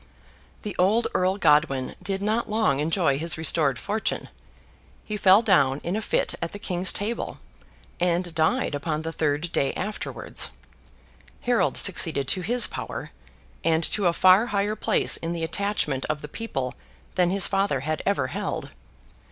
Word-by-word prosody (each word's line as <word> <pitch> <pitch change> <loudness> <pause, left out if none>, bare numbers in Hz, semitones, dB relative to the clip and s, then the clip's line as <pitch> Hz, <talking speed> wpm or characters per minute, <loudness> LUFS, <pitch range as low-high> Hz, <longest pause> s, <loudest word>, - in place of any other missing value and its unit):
The 210 - -5
old 210 +6 +3
Earl 185 +2 +1
Godwin 150 -7 +2
did 195 0 -3
not 220 +2 0
long 210 -11 +1
enjoy 155 -2 +1
his 165 -1 +2
restored 155 -4 +3
fortune. 210 +10 -3 0.8
He 215 - -4
fell 200 +2 +5
down 140 -10 +3
in 175 +3 -2
a 220 - -1
fit - - 0
at 170 - -4
the - - -5
King's 185 -3 0
table, 220 +4 -3 0.6
and 175 0 0
died 160 - +1
upon 150 +2 -3
the 165 - -4
third 155 +1 -1
day 140 - 0
afterwards. 210 +3 -3 0.9
Harold 245 -1 +1
succeeded 165 -7 +3
to 185 - +2
his 235 +6 +2
power, - - -6 0.5
and 165 0 +2
to 200 -4 +1
a - - +4
far 185 +6 +5
higher 205 0 -1
place - - +2
in 165 +1 -4
the 165 -1 -4
attachment 165 -6 -1
of 155 -1 -3
the - - -5
people 135 - -4 0.4
than 180 -1 +2
his 195 +1 +3
father 195 -9 0
had 155 +3 -2
ever 200 -10 0
held. 130 - -4
175 Hz, 160 wpm, -25 LUFS, 155-205 Hz, 0.9 s, fell